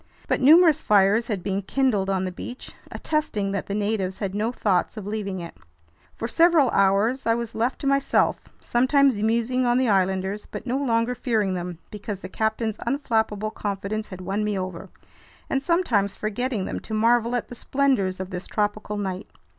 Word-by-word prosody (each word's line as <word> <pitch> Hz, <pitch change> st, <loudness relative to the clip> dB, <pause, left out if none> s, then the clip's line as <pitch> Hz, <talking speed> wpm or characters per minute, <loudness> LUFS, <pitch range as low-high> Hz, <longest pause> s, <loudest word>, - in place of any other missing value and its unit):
But -, -, 0 dB
numerous 315 Hz, +2 st, +6 dB
fires 210 Hz, +3 st, +3 dB
had 200 Hz, -6 st, -3 dB
been 195 Hz, 0 st, -1 dB
kindled 210 Hz, -3 st, 0 dB
on 190 Hz, -1 st, 0 dB
the 185 Hz, -, -3 dB
beach, 245 Hz, +7 st, -8 dB, 0.2 s
attesting 220 Hz, -11 st, -1 dB
that 200 Hz, -1 st, -3 dB
the 200 Hz, -, -3 dB
natives 205 Hz, -3 st, -1 dB
had 195 Hz, -3 st, -3 dB
no 215 Hz, +3 st, 0 dB
thoughts 205 Hz, -3 st, 0 dB
of 210 Hz, -, -6 dB
leaving 200 Hz, -2 st, -3 dB
it. 170 Hz, -1 st, -8 dB, 0.6 s
For 230 Hz, -, -4 dB
several 325 Hz, -1 st, +4 dB
hours 200 Hz, +7 st, +2 dB
I 230 Hz, -, +4 dB
was 235 Hz, -1 st, -4 dB
left 235 Hz, +4 st, -1 dB
to -, -, -5 dB
myself, 275 Hz, 0 st, +2 dB, 0.2 s
sometimes 260 Hz, -2 st, +2 dB
musing 235 Hz, +3 st, +1 dB
on 240 Hz, 0 st, +3 dB
the 255 Hz, -2 st, +2 dB
islanders—but 190 Hz, +2 st, -1 dB
no 255 Hz, +1 st, -1 dB
longer 235 Hz, -3 st, +1 dB
fearing 220 Hz, -6 st, 0 dB
them 175 Hz, -1 st, -4 dB
because 205 Hz, -2 st, -6 dB
the 185 Hz, -, -7 dB
captain's 220 Hz, +1 st, -1 dB
unflappable 220 Hz, -6 st, -1 dB
confidence 205 Hz, +1 st, -3 dB
had 185 Hz, -1 st, -9 dB
won 195 Hz, +3 st, -2 dB
me 210 Hz, -1 st, -1 dB
over—and 185 Hz, +8 st, -7 dB
sometimes 250 Hz, -, +1 dB
forgetting 215 Hz, -1 st, -2 dB
them -, -, -4 dB
to 220 Hz, -, -6 dB
marvel 235 Hz, +2 st, +3 dB
at 245 Hz, -, -3 dB
the -, -, -8 dB
splendors 245 Hz, -8 st, 0 dB
of 190 Hz, +1 st, -5 dB
this 180 Hz, 0 st, -6 dB
tropical 210 Hz, 0 st, -2 dB
night. 190 Hz, -1 st, -4 dB
215 Hz, 175 wpm, -24 LUFS, 195-245 Hz, 0.6 s, numerous